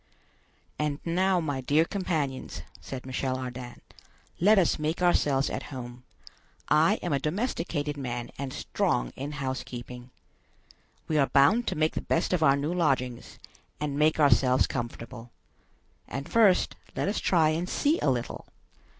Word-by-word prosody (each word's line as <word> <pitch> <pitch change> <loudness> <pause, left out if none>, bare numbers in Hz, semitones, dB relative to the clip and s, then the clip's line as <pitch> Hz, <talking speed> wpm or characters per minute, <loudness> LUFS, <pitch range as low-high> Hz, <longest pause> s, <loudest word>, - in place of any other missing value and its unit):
"And 150 -1 -1
now, 185 +2 +2
my 145 -5 -2
dear 150 +5 +3
companions," 160 -9 -3 0.2
said 130 -1 -7
Michel 130 0 -2
Ardan, 125 -1 -7 0.6
"let 205 +5 +5
us 180 -5 +3
make 155 +2 -1
ourselves 145 -6 +2
at - - -5
home; 125 -2 -8 0.7
I 160 +7 +5
am 175 - -1
a 140 - +2
domesticated 155 - -2
man 120 -3 -4
and 140 -1 -3
strong - - -1
in 140 +3 -5
housekeeping. 125 -3 -6 1.0
We 155 -1 +1
are 135 - +4
bound 165 +13 +4
to 185 - 0
make 155 0 +1
the - - -3
best 165 - 0
of 180 - +1
our 140 -3 +5
new 145 +4 -2
lodgings, 130 -8 -1 0.4
and 150 -2 -2
make 155 +2 +2
ourselves 135 -3 +4
comfortable. 120 -1 -6 0.8
And 140 +1 -5
first 210 -5 +4 0.2
let - - -1
us 205 - 0
try 165 -4 +3
and 165 +4 -1
see 300 +4 +1
a - - +2
little. 125 -2 -3
145 Hz, 150 wpm, -28 LUFS, 130-165 Hz, 1.0 s, let